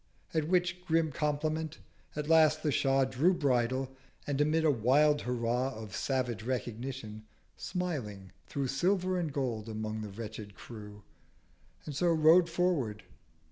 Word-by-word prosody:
At 155 -2 0
which 180 0 +1
grim 165 -2 +1
Compliment 155 +2 -1 0.4
at 150 0 -3
last 155 -1 +5
the 150 - +2
Shah 135 0 +3
Drew 150 +8 +2
Bridle: 130 -2 +1 0.3
and 145 0 0
amid 155 +2 +2
a 155 - +5
wild 145 +5 +3
Hurrah 125 +1 0
490 110 -4 -8
Of 105 - -9
savage 125 -5 -1
Recognition, 120 -2 -4 0.3
smiling 115 - -4 0.2
threw 140 +5 -2
Silver 185 +7 +1
and 165 -4 -2
Gold 120 -6 -2
among 110 0 -4
the 105 - -5
wretched 105 -1 -8
Crew, 105 -3 -10 0.8
And 150 - -6
so 175 +5 +1
rode 165 +1 +5
forward. 165 -11 0
135 Hz, 140 wpm, -31 LUFS, 115-160 Hz, 0.8 s, last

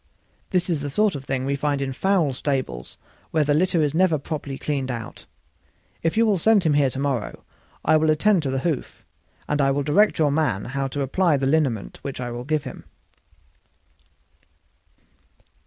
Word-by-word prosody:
This 180 -1 +1
is 170 -5 0
the 145 - -3
sort 210 +8 +2
of 140 -2 -7
thing 130 -1 -2
we 140 +1 0
find 145 0 -1
in 135 -1 -2
foul 180 -3 +1
stables, 130 - -3 0.3
where 155 - +2
the 145 0 +1
litter 170 +1 +2
is 145 -1 0
never 170 -1 +3
properly 140 -1 -5
cleaned 135 -3 -2
out. 115 -3 -7 0.7
If 165 +5 -1
you 230 - +5
will 205 -4 +2
send 215 +2 +4
him 155 -3 +2
here 145 -2 +3
to 130 - -7
morrow 135 -5 -2 0.4
I 155 0 +5
will 155 0 +2
attend 180 +5 +3
to 140 - -2
the 130 0 -1
hoof, 160 -5 -3 0.4
and 150 0 +1
I 135 - +3
will 140 +1 0
direct 185 +9 +3
your 150 -4 +3
man 145 -10 0
how 135 +2 -2
to 140 +1 -3
apply 160 +3 +2
the 135 - -1
liniment 135 -8 0
which 140 -2 -6
I 120 -1 -4
will 120 +1 -6
give 155 0 0
him." 130 - -9
145 Hz, 190 wpm, -23 LUFS, 135-160 Hz, 0.7 s, you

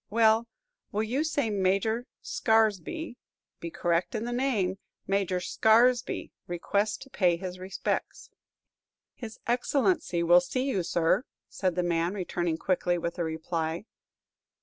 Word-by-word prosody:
Well, 225 +1 +4 0.4
will 210 +1 0
you 255 +7 0
say 285 -8 0
Major 200 +5 +1 0.2
Scaresby 225 - +1 0.4
be 170 - -5
correct 170 +6 0
in 220 +1 -2
the 240 - -3
name 215 -8 0 0.3
Major 195 -2 0
Scaresby 230 +6 +3 0.2
requests 200 +4 0
to 270 - -17
pay 175 -3 +2
his 185 0 -6
respects." 190 +1 -3 0.8
"His 225 -3 -8
Excellency 250 - +1
will 175 +1 +6
see 255 +8 -2
you, 225 -9 0
sir," 170 +8 +1 0.2
said 185 -3 -1
the 180 - +1
man, 170 +2 0
returning 175 -3 -2
quickly 175 0 0
with 170 0 -3
the 175 - 0
reply. 160 +2 -3
195 Hz, 130 wpm, -28 LUFS, 175-230 Hz, 0.8 s, will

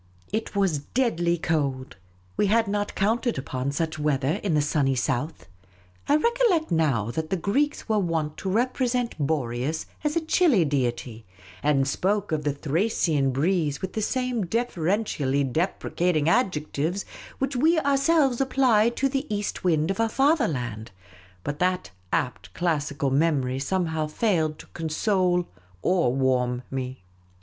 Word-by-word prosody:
It 220 -1 -2
was 190 -7 +2
deadly 175 - 0
cold. 140 -6 -1 0.4
We 205 - +2
had 225 +2 +3
not 205 0 -2
counted 230 +4 +1
upon 130 0 -3
such 160 +2 -2
weather 150 +3 0
in 185 -6 0
the - - +4
sunny 145 -3 +1
south. 140 +4 -2 0.6
I 290 - +6
recollect 460 -3 +2
now 135 -10 +1
that 155 +5 -3
the 190 - 0
Greeks 280 - 0
were 215 -2 +2
wont 160 -5 -1
to 190 - -4
represent 245 +2 0
Boreas 140 0 -1 0.2
as 300 +1 0
a - - +4
chilly 310 - +4
deity, 120 -5 -2 0.4
and 140 -2 +2
spoke 200 +7 0
of 155 -1 0
the 145 - +1
Thracian 150 -1 0
breeze 150 +1 0
with 190 - -3
the 220 - -2
same 250 -3 -1
deferentially 175 - 0
deprecating 160 +2 0
adjectives 170 - 0 0.3
which 270 0 -2
we 320 +7 +3
ourselves 275 -2 +2
apply 255 -5 +3
to 260 +3 0
the 270 0 -3
east 205 0 -3
wind 160 -1 +2
of 195 - -4
our 225 0 +2
fatherland; 155 - 0 0.5
but 145 0 -4
that 180 - 0 0.2
apt 125 - -2
classical 145 -5 -1
memory 135 -3 +1
some 180 +7 0
how 160 -1 -2
failed 160 -3 0
to - - -12
console 180 +2 +1 0.4
or 175 -9 +2
warm 125 -1 +1
me. 130 -4 -5
170 Hz, 145 wpm, -25 LUFS, 140-225 Hz, 0.6 s, I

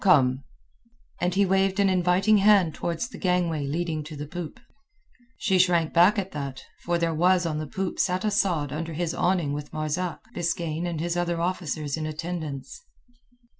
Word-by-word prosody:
Come." 135 -8 +4 0.8
And 180 +1 0
he 200 +1 +4
waved 195 +1 +2
an 200 - +4
inviting 185 +3 +3
hand 195 -5 +5
towards 170 +9 -3
the 255 - -11
gangway 175 -6 0
leading 160 +1 -2
to 155 0 -8
the 145 0 -5
poop. 165 +1 -7 0.8
She 190 -3 +2
shrank 175 -3 +3
back 180 +6 +5
at 195 -1 -2
that, 140 -3 -5 0.2
for 175 0 +1
there 170 -1 0
on 175 -4 +3
the 155 - -4
poop 195 -2 -3
sat 185 +1 +1
Asad 175 -9 +1
under 165 +2 -4
his 165 +1 -2
awning 175 -6 +1
with 145 0 -5
Marzak, 155 +3 -2
Biskaine, 170 -1 -2
and 170 -3 -3
his 170 +1 -1
other 175 -1 -1
officers 160 -4 -2
in 155 0 -3
attendance. 155 - -5
170 Hz, 170 wpm, -26 LUFS, 155-185 Hz, 0.8 s, hand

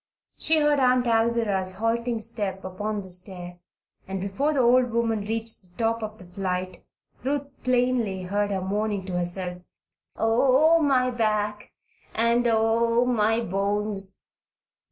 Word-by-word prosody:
She 320 0 +2
heard 295 -1 +3
Aunt 250 -1 +3
Alvirah's 225 -5 +1
halting 230 +2 -1
step 195 -3 -1
upon 205 +3 -3
the 190 -1 -10
stair 180 -1 -3 0.5
and 190 0 -4
before 200 +11 -1
the 280 -3 +1
old 245 +1 +4
woman 230 -1 0
reached 225 +2 -1
the 180 -2 -11
top 230 0 0
of 215 0 -6
the 185 - -11
flight, 185 0 -4 0.4
Ruth 280 +1 -1 0.2
plainly 245 -6 +1
heard 205 +3 -1
her 195 -2 -2
moaning 205 0 -2
to 180 -2 -3
herself: 180 0 -3 0.5
"Oh, 265 +8 +4
my 255 -4 +2
back! 210 -3 -1 0.4
and 235 +1 +3
oh, 230 +1 +2
my 225 -2 +2
bones!" 200 0 -1
220 Hz, 135 wpm, -25 LUFS, 195-240 Hz, 0.5 s, old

